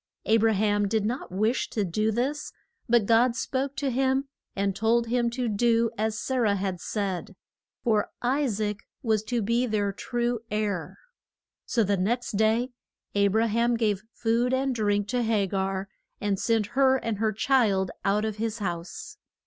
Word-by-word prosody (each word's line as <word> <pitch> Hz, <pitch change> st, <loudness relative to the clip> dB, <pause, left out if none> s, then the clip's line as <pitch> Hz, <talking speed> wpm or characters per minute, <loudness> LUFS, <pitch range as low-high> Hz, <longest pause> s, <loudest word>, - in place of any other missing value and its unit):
A 225 Hz, -, +4 dB
bra 225 Hz, 0 st, +3 dB
ham 205 Hz, 0 st, +2 dB
did 215 Hz, 0 st, 0 dB
not 245 Hz, 0 st, -3 dB
wish 215 Hz, +6 st, 0 dB
to 215 Hz, -, -1 dB
do 215 Hz, +5 st, 0 dB
this, 270 Hz, +7 st, -2 dB, 0.4 s
but 235 Hz, -3 st, +4 dB
God 235 Hz, +2 st, +4 dB
spoke 270 Hz, +2 st, -2 dB
to 275 Hz, -2 st, -1 dB
him 265 Hz, +2 st, +1 dB, 0.3 s
and 195 Hz, -1 st, 0 dB
told 230 Hz, +3 st, +2 dB
him 240 Hz, 0 st, +1 dB
to 245 Hz, +1 st, -2 dB
do 230 Hz, +1 st, +2 dB
as 215 Hz, 0 st, -1 dB
Sa 260 Hz, +5 st, -2 dB
rah 215 Hz, -5 st, +3 dB
had 190 Hz, -2 st, -2 dB
said, 195 Hz, -3 st, -3 dB, 0.5 s
for 215 Hz, -3 st, +2 dB
I 270 Hz, +4 st, +1 dB
saac 210 Hz, -2 st, -1 dB, 0.3 s
was 220 Hz, -3 st, +2 dB
to 240 Hz, -2 st, -1 dB
be 235 Hz, +4 st, +1 dB
the 205 Hz, -3 st, 0 dB
true 240 Hz, +1 st, -1 dB
heir. 205 Hz, -7 st, -2 dB, 0.7 s
So 230 Hz, -, +2 dB
the 200 Hz, 0 st, +1 dB
next 235 Hz, +7 st, 0 dB
day 220 Hz, +4 st, +2 dB, 0.4 s
A 200 Hz, 0 st, +3 dB
bra 220 Hz, +3 st, +2 dB
ham 235 Hz, +2 st, +1 dB
gave 210 Hz, -4 st, +1 dB
food 240 Hz, +3 st, +1 dB
and 265 Hz, 0 st, 0 dB
drink 205 Hz, -3 st, 0 dB
to 250 Hz, 0 st, +1 dB
Ha 220 Hz, -3 st, +2 dB
gar 195 Hz, 0 st, -2 dB, 0.3 s
and 200 Hz, -2 st, -1 dB
sent 225 Hz, -2 st, +2 dB
her 265 Hz, 0 st, +4 dB
and 225 Hz, -5 st, -3 dB
her 220 Hz, 0 st, +2 dB
child 210 Hz, -5 st, +2 dB
out 210 Hz, +2 st, +2 dB
of 215 Hz, -1 st, -3 dB
his 225 Hz, 0 st, -2 dB
house. 175 Hz, -5 st, -5 dB
220 Hz, 175 wpm, -27 LUFS, 205-240 Hz, 0.7 s, A